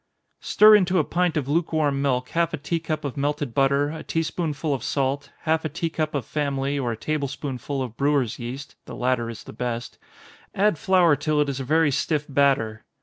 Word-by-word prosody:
_ - - -27
Stir 215 +1 +7
into 185 -2 +3
a 160 - +4
pint 175 +1 0
of 140 -3 -1
lukewarm 155 -2 +1
milk 130 -2 0
half 165 -1 0
a - - -9
tea 165 +4 -2
cup 155 -2 -3
of 140 - -4
melted 145 -2 -2
butter, 140 +2 +2
a 160 0 -6
tea 165 - -1
spoonful 155 -2 -2
of 130 -4 -3
salt, 140 +1 -1
half 160 0 +1
a 155 - -2
tea 165 +2 -3
cup 155 -2 -2
of 135 -5 -2
family, 140 -1 -1
or 125 -3 -1
a 115 - -4
table 150 +2 -2
spoonful 135 0 -4
of 115 -3 -8
brewers' 140 -5 +1
yeast, 130 +4 -7
(the - - -8
latter 125 -2 0
is 115 - -8
the - - -11
best;) 120 -1 -4 0.6
add 200 -5 +2
flour 180 -5 +4
till 150 +1 0
it 145 -1 +2
is 135 -1 -3
a - - -3
very 155 +2 +3
stiff 150 +2 0
batter. 135 -6 +1
145 Hz, 215 wpm, -24 LUFS, 135-160 Hz, 0.6 s, Stir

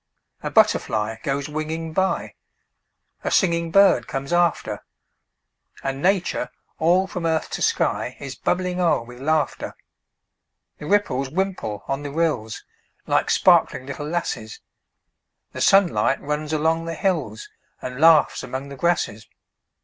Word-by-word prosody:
A - - -3
butterfly 110 +1 +2
goes 140 0 -2
winging 155 +2 -4
by; 190 +2 0 0.9
A - - -1
singing 170 -3 +2
bird 195 -10 +5
comes 135 +4 -4
after; 175 -1 +1 1.0
And 135 0 -3
Nature, 180 -8 +1 0.3
all 175 +4 +3
from 180 -3 -3
earth 160 -1 -1
to - - -4
sky, 125 - 0
Is 140 -1 -6
bubbling 180 +4 -1
o'er 170 -8 +2
with 125 +1 -12
laughter. 155 +1 -1 1.0
The 150 - -7
ripples 145 -9 +1
wimple 170 - -3
on 135 +1 -2
the 145 - -5
rills, 145 -8 -1 0.4
Like - - +1
sparkling 130 - +4
little 140 +2 -6
lasses; 135 -9 -3 0.9
The - - -6
sunlight 180 - +4
runs 150 +1 -3
along 160 +2 +1
the 165 0 -4
hills, 150 - -2 0.3
And 125 +2 -6
laughs 160 -1 +5
among 130 +2 -6
the 140 - -8
grasses. 150 -10 -1
155 Hz, 130 wpm, -23 LUFS, 135-175 Hz, 1.0 s, bird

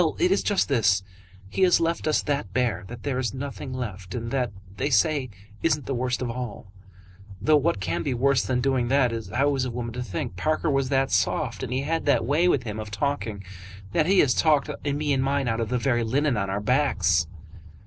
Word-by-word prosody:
"Well; 160 -3 +1
it 180 - +2
is 195 - +3
just 205 -2 +1
this. 105 -8 +2 0.4
He 100 - -4
has 185 -1 +5
left 165 -1 -1
us 155 - +2
that 140 -10 -2
bare 120 -6 0
that 120 0 -9
there 135 -3 -1
is 125 -2 -2
nothing 135 0 -6
left. 100 -8 -5
And 115 -1 -4
that, 125 -5 0 0.3
they 140 - 0
say, 140 +1 +2 0.3
isn't 150 -3 +1
the 135 - -2
worst 125 0 -1
of 120 - -2
all, 115 -5 -6 0.7
though 155 +8 +4
what 130 -8 +1
can 90 -3 -2
be 135 -4 -1
worse 135 +2 +3
than 125 -1 -1
doing 130 -2 +1
that, 130 -1 +3 0.2
how 140 +1 +2
is 130 - 0
a - - -2
woman 120 -1 -4
to 125 - -4
think? 95 -5 -4
Parker 155 - 0
was 135 -1 +1
that 135 -1 +1
soft, - - 0
and - - -4
he 130 +1 0
had 165 +2 -2
that 140 - +3
way 150 +7 +2
with 180 - +2
him 110 -2 -5
of 105 -1 -5
talking, 110 -2 -2 0.5
that 155 - +2
he 195 +1 +4
has 130 -4 +3
talked 150 0 +2
me 145 0 0
and 135 - +1
mine 140 -1 0
out 115 -1 0
of 115 - -2
the 125 - +1
very 120 -1 +1
linen 135 +4 +1
on 100 -2 -1
our 100 +1 -2
backs." 95 - +2
130 Hz, 225 wpm, -25 LUFS, 115-145 Hz, 0.7 s, has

